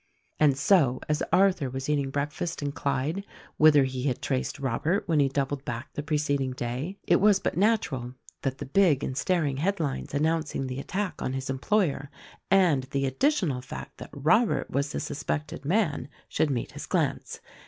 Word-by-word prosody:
And 145 -3 +4
so, 140 -5 +3
as 150 0 0
Arthur 180 -6 +3
was 130 +1 -5
eating 145 -2 +1
breakfast 145 +4 -3
in 145 - -1
Clyde, 140 +7 -1 0.3
whither 150 -2 +7
he 130 0 -3
had 130 -4 0
traced 130 -2 -2
Robert 140 - -1
when 160 -3 +2
he 140 -1 +4
doubled 140 0 -2
back 120 +3 -6
the - - -3
preceding 145 -3 0
day, 130 +10 -4
it - - +5
was 205 -1 +5
but - - -2
natural 160 - +1 0.3
that 135 -1 -2
the - - -6
big 150 -2 +3
and 130 - -3
staring 150 -4 0
headlines 155 -5 -2
announcing 155 -2 0
the 130 0 -4
attack 185 +2 -3
on 130 - -2
his 135 0 -3
employer 145 0 0 0.4
and 175 -9 +4
the 135 0 -1
additional 150 - +1
fact 135 +5 -9
that - - -8
Robert 170 - +2
was 140 +1 0
the - - -3
suspected 145 0 -4
man 155 - 0 0.2
should 155 - +1
meet 125 -4 -2
his - - -8
glance. - - -1
145 Hz, 175 wpm, -27 LUFS, 135-170 Hz, 0.4 s, whither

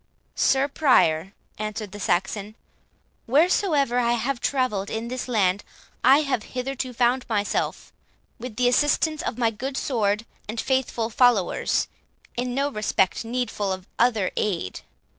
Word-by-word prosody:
"Sir 270 +1 +2
Prior," 195 - +3 0.3
answered 215 -1 -4
the 205 - -8
Saxon, 200 +3 -1 0.7
"wheresoever 290 - +3
I 235 -1 +2
have 240 +2 -1
travelled 245 -7 0
in 225 +1 -4
this 255 +1 -4
land, 200 -5 +1 0.4
I 270 +4 +7
have 275 -6 -1 0.2
hitherto 260 0 -3
found 245 +1 +2
myself, 205 -2 -1 0.5
with 240 -2 -7
the 245 +2 +2
assistance 295 +4 +2
of 235 - -3
my 230 -2 +2
good 265 +5 -5
sword 215 -4 0 0.2
and 225 +2 -3
faithful 245 -3 0
followers, 235 -6 +2 0.5
in 245 0 -2
no 280 +1 0
respect 210 -3 0
needful 230 -4 -2
of 185 -1 -4
other 225 -6 +2
aid. 175 - -1
240 Hz, 135 wpm, -24 LUFS, 210-260 Hz, 0.7 s, I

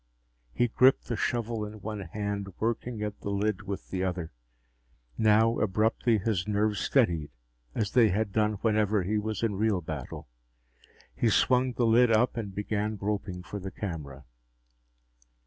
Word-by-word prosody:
He 120 - +1
gripped 130 +3 +4
the 120 - 0
shovel 115 -1 -1
in 105 +1 -7
one 105 0 -5
hand, 100 +2 -4
working 115 0 -2
at 105 -1 -4
the - - -5
lid 100 0 0
with 100 -1 -6
the 95 -1 -1
other. 90 -3 -3 0.8
Now, 110 +1 +3
abruptly, 110 +3 +2
his 105 -2 -1
nerves 105 0 +1
steadied, 85 - +1 0.5
as 105 -2 -1
they 120 -4 +5
had 100 +2 0
done 105 +1 +2
whenever 105 -3 +2
he 105 +4 0
was 110 0 -3
in 115 -3 +1
real 105 -2 +2
battle. 75 -5 -7 0.9
He 115 - +1
swung 125 +3 +3
the 120 - +1
lid 120 +2 +5
up 115 +3 +3
and 105 -5 -5
began 105 +1 -2
groping 100 -3 -3
for 100 - -6
the 95 0 -5
camera. 75 -8 -6
105 Hz, 155 wpm, -28 LUFS, 95-110 Hz, 0.9 s, they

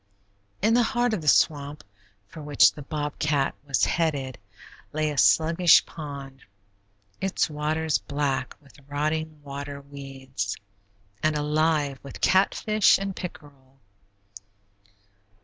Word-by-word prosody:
In 220 +2 +4
the 245 - +5
heart 240 0 +1
of 200 - -1
the 150 - -8
swamp, 145 -2 +2 0.4
for 155 - -11
which 145 -1 +5
the 150 - -9
bobcat 150 -1 -1
was 140 -3 +2
headed, 140 -7 -1 0.5
lay 155 0 0
a 145 - -6
sluggish 170 +4 +5
pond, 140 -4 -9 0.8
its 190 -3 0
waters 155 +1 0
black 140 -3 -2
with 145 -1 -20
rotting 155 +1 -2
water 140 0 -6
weeds, 135 -7 -6 0.6
and 155 0 +1
alive 150 -2 +1
with 140 - -10
catfish 205 +2 +3
and 195 -1 -4
pickerel. 140 -6 -10
150 Hz, 115 wpm, -26 LUFS, 140-160 Hz, 0.8 s, the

